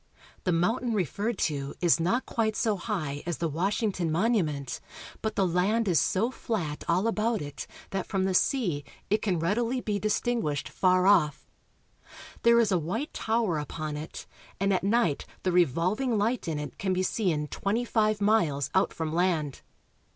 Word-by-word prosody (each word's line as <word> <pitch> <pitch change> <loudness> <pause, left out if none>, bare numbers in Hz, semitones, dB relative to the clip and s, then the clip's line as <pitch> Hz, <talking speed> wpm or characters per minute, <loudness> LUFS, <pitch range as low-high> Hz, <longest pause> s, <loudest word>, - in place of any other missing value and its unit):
The 180 - +2
mountain 225 +8 +1
referred 205 - -1
to 140 -3 -3
is 175 -2 +4
not 190 +10 +1
quite 220 -2 0
so 220 -3 +1
high 175 -8 -3
as 175 - -1
the 170 - -1
Wash 180 - -1
ington 185 -6 0
Monument, 160 - 0 0.4
but 220 -1 -2
the 195 - +2
land 195 +6 +1
is 175 -4 +4
so 225 +7 +1
flat 175 - -3
all 180 +5 +2
about 225 0 +1
it 145 -2 -6
Montevideo. - - -17
that 195 -2 -2
from 195 -2 0
the 190 - 0
sea 180 - +1 0.3
it 210 - +3
can 190 -5 0
readily 230 +9 0
be 210 -4 -2
distinguished 215 - 0
far 185 -1 +3
off. 170 -7 +3 1.0
There 235 0 +6
is 220 -3 +3
a 185 - +3
white 220 - -3
tower 220 -8 0
upon 150 +1 -4
it, 150 +2 -7 0.3
and 195 +1 +2
at 185 - 0
night 200 -7 +1 0.2
the 185 - +1
revolving 180 - +2
light 225 +2 0
in 160 -2 -1
it 150 0 -6
can 190 -1 0
be 185 0 0
seen 180 -7 0
twenty 225 +5 -1
five 215 -2 +1
miles 175 - +2
out 190 - +2
from 160 -1 -3
land. 165 -5 0
190 Hz, 175 wpm, -28 LUFS, 165-220 Hz, 1.0 s, There